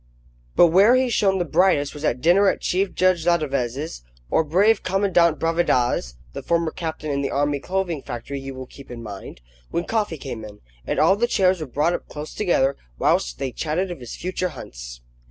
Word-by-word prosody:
But 175 - +7
where 200 +8 +6
he 255 0 +2
shone 195 -3 +2
the 175 - 0
brightest 160 -4 +2
was 150 - -9
at 125 -4 0
dinner 190 +4 +5
at - - -2
Chief 190 +1 0
Judge 185 -3 +2
Ladeveze's, 145 - -1 0.3
or - - +3
brave 200 +8 +3
Commandant 185 -4 +2
Bravida's 135 - +1 0.2
(the - - -5
former 170 -1 0
captain 160 -3 -4
in 140 0 -1
the 135 - -1
Army 145 0 0
Clothing 180 -2 -2
Factory, 130 +4 -6
you 135 0 -7
will 130 0 -7
keep 140 +2 -14
in 120 -1 -8
mind), 100 - -9 0.3
when 170 - -1
coffee 210 -7 -1
came 125 -5 -7
in, 105 -1 -10 0.3
and - - -1
all 195 - +5
the 235 +4 +1
chairs 185 -6 +2
were 155 - -4
brought 150 +7 +1
up - - -5
closer 150 +1 -8
together, 140 -9 +2 0.2
whilst - - +1
they 135 - -3
chatted 170 +7 -2
of 175 - -7
his 120 -2 -8
future 185 0 -2
hunts. - - -10
160 Hz, 195 wpm, -23 LUFS, 135-185 Hz, 0.3 s, But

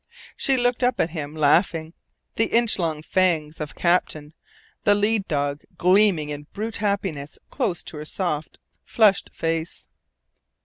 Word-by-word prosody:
She 270 -1 +1
looked 245 0 +1
up 250 0 +1
at 160 - +1
him, 155 -2 -5
laughing, 160 +2 +2 0.4
the 225 - +2
inch 230 -3 +2
long 160 -3 -2
fangs 160 -4 +1
of 150 - -5
Captain, 160 -4 0 0.5
the 205 - +5
lead 205 0 +1
dog, 145 -1 -1 0.2
gleaming 185 -4 +4
in 145 0 -6
brute 220 +2 -4
happiness 195 -9 -2
close 175 -5 -1
to 155 - -9
her 150 - -6
soft, 155 -3 -3 0.3
flushed 210 -4 +3
face. 165 0 -3
170 Hz, 140 wpm, -23 LUFS, 150-205 Hz, 0.5 s, the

